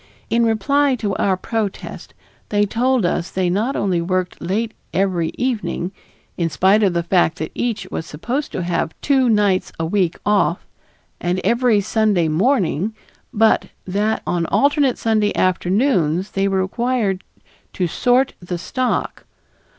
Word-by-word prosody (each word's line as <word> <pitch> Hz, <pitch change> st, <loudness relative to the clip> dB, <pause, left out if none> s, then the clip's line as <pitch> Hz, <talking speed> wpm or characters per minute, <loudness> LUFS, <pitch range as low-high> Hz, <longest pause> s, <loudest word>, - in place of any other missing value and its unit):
In 235 Hz, +1 st, +3 dB
reply 270 Hz, +5 st, +2 dB
to 205 Hz, -5 st, -2 dB
our 190 Hz, -2 st, +1 dB
protest 210 Hz, 0 st, -4 dB, 0.3 s
they 205 Hz, 0 st, +2 dB
told 245 Hz, +1 st, +1 dB
us 170 Hz, 0 st, -1 dB
they 185 Hz, -2 st, 0 dB
not 220 Hz, +9 st, 0 dB
only 185 Hz, -4 st, 0 dB
worked 185 Hz, +1 st, -2 dB
late 215 Hz, +6 st, -1 dB, 0.2 s
every 180 Hz, -3 st, +1 dB
evening, 225 Hz, -7 st, -2 dB, 0.5 s
in 170 Hz, -2 st, 0 dB
spite 190 Hz, +7 st, +3 dB
of 195 Hz, -4 st, +3 dB
the 170 Hz, 0 st, 0 dB
fact 175 Hz, -1 st, +2 dB
that 155 Hz, -, -4 dB
each 230 Hz, -5 st, -2 dB
was 160 Hz, -, -4 dB
supposed 245 Hz, -, -3 dB
to 180 Hz, -, -2 dB
have 170 Hz, -2 st, -2 dB
"two 265 Hz, -3 st, +3 dB
nights 205 Hz, -4 st, +2 dB
a 165 Hz, -, 0 dB
week 180 Hz, 0 st, 0 dB
off," 200 Hz, -4 st, +1 dB, 0.5 s
and 175 Hz, +1 st, -1 dB
every 235 Hz, 0 st, +3 dB
Sunday 210 Hz, -4 st, +1 dB
morning, 195 Hz, -, +1 dB, 0.4 s
but 220 Hz, +1 st, +3 dB, 0.2 s
that 205 Hz, +4 st, -1 dB
on 170 Hz, -2 st, -1 dB
alternate 280 Hz, -2 st, +2 dB
Sunday 215 Hz, -2 st, +1 dB
afternoons 185 Hz, -, +1 dB
they 195 Hz, 0 st, 0 dB
were 190 Hz, -1 st, +1 dB
required 215 Hz, -2 st, -1 dB, 0.5 s
"to 180 Hz, -, 0 dB
sort 250 Hz, +9 st, +2 dB
the 175 Hz, -1 st, -5 dB
stock." 250 Hz, +8 st, -2 dB
200 Hz, 145 wpm, -20 LUFS, 180-230 Hz, 0.5 s, In